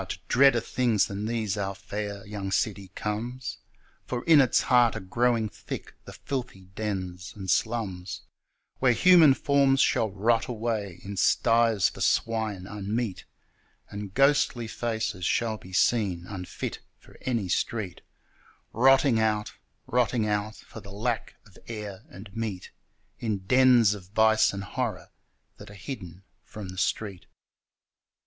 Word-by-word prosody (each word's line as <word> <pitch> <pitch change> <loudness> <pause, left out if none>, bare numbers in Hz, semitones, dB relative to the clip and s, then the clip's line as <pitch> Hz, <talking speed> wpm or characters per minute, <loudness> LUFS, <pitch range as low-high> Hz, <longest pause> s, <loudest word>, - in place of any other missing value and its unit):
to - - -3
dreader 135 -2 +5
things 115 -3 +1
than 105 -1 -4
these 110 -4 -1
our 100 -1 -3
fair 100 +1 -6
young 100 -2 -5
city 100 -1 -1
comes, 120 +5 -4 0.5
For 125 -1 -3
in 160 -3 +7
its 130 - +3
heart 120 -3 +4
are - - -3
growing 115 +3 +1
thick - - -8
the - - -10
filthy 125 -8 -5
dens 95 -3 -4
and 95 -2 -7
slums, 100 -6 -2 0.6
Where 125 -2 +4
human 165 0 +7
forms 140 -2 +3
shall 110 -4 +3
rot 110 +4 +1
away 110 -6 -3
in 100 0 -7
sties 115 +2 +3
for - - -8
swine 110 -5 0
unmeet, 105 +1 -3 0.7
And 100 -1 -6
ghostly 135 -2 +2
faces 110 -4 -3
shall 110 +4 0
be 95 - -13
seen 95 -3 +1
unfit 90 -2 -6 0.2
for - - -20
any 115 -7 -1
street 95 0 -2 0.7
Rotting 135 0 +5
out, 105 -1 0 0.3
rotting 120 -2 +1
out, 105 0 -1
For - - -12
the 100 -2 -12
lack 115 +4 -3
of 100 -3 -18
air 105 -4 -7
and 100 +2 -12
meat 110 -5 -4 0.5
In 105 -5 -3
dens 125 -2 +5
of 100 -3 -9
vice 110 +2 +4
and 100 0 -5
horror 95 - -4 0.5
that - - -12
are 100 - -12
hidden 95 - -8 0.2
from 105 -4 -9
the 95 - -9
street. 100 -4 -2
110 Hz, 140 wpm, -27 LUFS, 100-120 Hz, 0.7 s, in